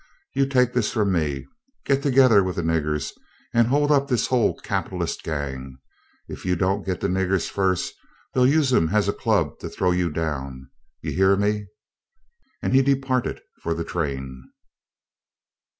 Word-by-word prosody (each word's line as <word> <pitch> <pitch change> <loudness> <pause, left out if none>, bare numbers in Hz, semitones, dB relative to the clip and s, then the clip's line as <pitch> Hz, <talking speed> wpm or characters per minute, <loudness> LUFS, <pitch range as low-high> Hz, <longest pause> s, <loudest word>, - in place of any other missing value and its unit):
You 135 0 +2
take 125 -2 +2
this 125 -4 +1
from 105 -4 +1
me: 75 -6 -1 0.4
get 135 0 +2
together 130 -7 +5
with 95 -1 -3
the 85 - -2
niggers 75 -3 -1 0.4
and 115 -1 +4
hold 145 +3 +2
up 140 -1 +3
this 125 -4 +1
whole 120 -5 +1
capitalist - - -3
gang. 65 -4 -5 0.5
If - - -8
you 90 0 +1
don't 95 +3 0
get 95 -2 -3
the - - +1
niggers 95 -1 0
first, 95 -2 0 0.4
they'll 125 -1 +4
use 140 -2 +3
'em 80 -8 +3
as 105 +1 +2
a 100 - +1
club - - 0
to - - -6
throw 90 -1 0
you 90 -1 +1
down. 70 -5 -4 0.3
You - - -3
hear 95 +1 +4
me," 105 +1 0 1.0
and - - 0
he 135 - +6
departed 135 -2 0 0.2
for 85 0 -1
the 85 - -3
train. 65 -6 -4
95 Hz, 165 wpm, -24 LUFS, 80-125 Hz, 1.0 s, he